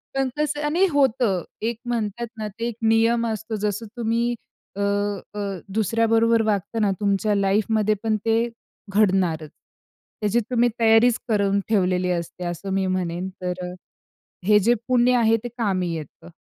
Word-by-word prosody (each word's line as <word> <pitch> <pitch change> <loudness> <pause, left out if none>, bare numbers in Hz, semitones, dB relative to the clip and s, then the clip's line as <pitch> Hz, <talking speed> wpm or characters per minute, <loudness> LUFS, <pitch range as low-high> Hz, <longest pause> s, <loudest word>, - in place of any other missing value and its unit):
पण 270 -1 +1
कसं 295 0 -1
आणि 335 +6 +3
होतं. 245 - +2 0.2
एक 230 +1 -1
म्हणतात 235 -1 -2
ना, 215 - -3
ते 230 +3 -4
एक 235 - -4
नियम 225 +1 +3
असतो 220 0 -3
जसं 210 +1 -2
तुम्ही 235 +1 0 0.4
अ, 200 - -3
अ, 205 0 -2 0.3
दुसऱ्या 225 +2 +1
बरोबर 225 0 +3
वागता 215 +1 -1
ना 210 -2 +2
तुमच्या 205 +1 +1
लाईफ 200 +1 +2
मध्ये 215 -1 +2
पण 220 -1 +1
ते 225 0 +3 0.5
घडणारच. 185 -7 +2 0.7
त्याची 210 +2 +2
तुम्ही 245 -1 +3
तयारीच 225 +1 +5
करून 200 -3 +2
ठेवलेली 185 -3 +2
असते 170 +1 -4
असं 175 +3 -4
मी 195 0 +1
म्हणेन 180 -1 -2
तर 180 0 -3
अ, - - -9 0.7
हे 210 0 +6
जे 225 +4 +3
पुण्य 250 0 +4
आहे 225 -1 +4
ते - - -3
कामी 185 -6 0
येतं. 155 +1 -9
215 Hz, 155 wpm, -23 LUFS, 195-230 Hz, 0.7 s, हे